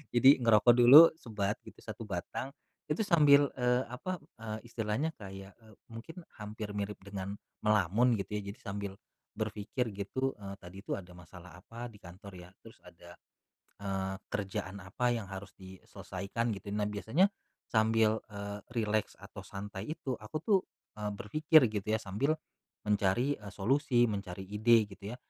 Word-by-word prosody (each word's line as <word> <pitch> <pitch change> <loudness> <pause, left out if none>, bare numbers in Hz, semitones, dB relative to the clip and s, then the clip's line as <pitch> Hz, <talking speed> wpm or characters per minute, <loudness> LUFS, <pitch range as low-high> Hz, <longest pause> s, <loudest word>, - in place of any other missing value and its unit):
Jadi 130 +3 +8
ngerokok 115 0 +6
dulu 130 +7 +10
sebat 105 -3 -2
gitu - - -13
1 - - -7
batang. 100 +7 -4 0.4
Itu 150 +7 0
sambil, 145 -6 +6
eee, 125 0 +2
apa, 185 +9 -4 0.2
eee, 110 -1 -4
istilahnya 115 +6 -2
kayak, 95 -1 -9
eee, 110 -2 -18 0.2
mungkin 160 +10 -9 0.2
hampir 105 0 -6
mirip 100 0 -3
dengan 100 -1 -5 0.3
melamun 105 +4 +4
gitu 105 +1 -3
ya. - - -3
Jadi - - -22
sambil 100 -1 -4 0.5
berpikir 115 +4 -2
gitu, 130 +7 -2
eee, 100 -1 -7
"Tadi 90 +1 -11
tuh - - -2
ada 90 -2 -10
masalah 90 0 -13
apa 115 +5 -8
di 105 - -15
kantor 95 +3 -12
ya? 90 0 -11
Terus - - -14
ada, - - -14 0.7
eee, 95 -1 -2 0.2
kerjaan 100 -1 -3
apa 120 +6 0
yang 115 - -4
harus 95 +1 -8
diselesaikan?" 100 +4 -5
Gitu. 100 +2 -10
Nah, 105 - +1
biasanya 110 - +2 0.4
sambil, 110 0 +3
eee, 100 0 -5
rileks 110 -2 0
atau 100 +1 -10
santai 100 +1 -7
itu, 135 -4 -3
aku 110 +8 -7
tuh, 205 -3 +5 0.4
eee, 105 - -1
berpikir 155 +10 +4
gitu 105 -2 -4
ya 110 - +2
sambil 130 +11 0 0.5
mencari, 105 +7 +2
eee, 105 -1 -10
solusi, 120 +3 +2
mencari 95 -2 -5
ide 110 +2 +4
gitu 100 +2 -8
ya. - - -6
105 Hz, 155 wpm, -32 LUFS, 100-120 Hz, 0.7 s, dulu